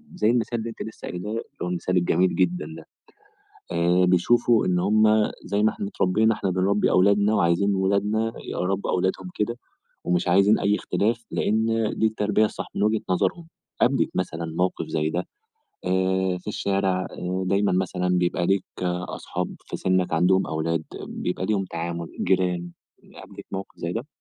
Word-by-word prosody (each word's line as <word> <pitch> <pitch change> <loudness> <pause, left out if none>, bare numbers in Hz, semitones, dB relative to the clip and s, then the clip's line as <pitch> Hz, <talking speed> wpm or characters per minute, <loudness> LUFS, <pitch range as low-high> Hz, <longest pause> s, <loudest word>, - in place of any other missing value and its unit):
زي 115 -11 +2
المثال 120 -1 +1
اللي 115 +1 -4
أنتِ 115 - -9
لسّه - - -10
قايلاه، 90 +4 -5
اللي 115 - -3 0.2
هو - - -2
المثال 90 +1 -1
الجميل 90 +1 +2
جدًا 90 -4 +1
ده. - - -11 0.9
آآ 85 +2 +3
بيشوفوا 115 +6 +3
إن 90 -1 +2
هم 105 +4 +3 0.4
زي 100 +2 0
ما 110 - +4
إحنا 200 -1 -5
اتربّينا 110 - +2
إحنا 95 - -2
بنربّي 95 +3 +2
أولادنا 100 +3 +4
وعايزين 95 +3 +2
ولادنا 105 +4 +1
يربّوا 95 +2 -2
أولادهم 90 0 -1
كده، 120 +3 -1 0.5
ومش 90 0 0
عايزين 100 +4 +5
أي 100 +1 +2
اختلاف 115 +3 -1
لإن 110 +1 +1 0.3
دي 110 - +3
التربية 105 0 +1
الصح - - -5
من - - 0
وجهة 110 0 +2
نظرهم. 165 - 0 0.3
قابلِك 130 0 +3
مثلًا 85 -2 -2
موقف 90 +1 0
زي 75 0 0
ده؟ 90 +3 -2 0.6
آآ 95 0 +1
في 90 - -15
الشارع 95 -3 0 0.4
دايمًا 100 +2 +2
مثلًا 90 0 0
بيبقى 85 0 +1
ليك 95 -1 +2 0.5
أصحاب - - -4
في - - -5
سِنّك 95 -2 +1
عندهم 90 +2 +3
أولاد 80 +1 -1 0.2
بيبقى 90 +1 -3
ليهم 100 -2 0
تعامل، 85 -1 -4 0.2
جيران، 90 -2 +1 0.4
قابلِك - - -11
موقف 95 0 -6
زي 85 +1 -3
ده؟ 120 +6 -4
95 Hz, 160 wpm, -24 LUFS, 90-105 Hz, 0.9 s, عايزين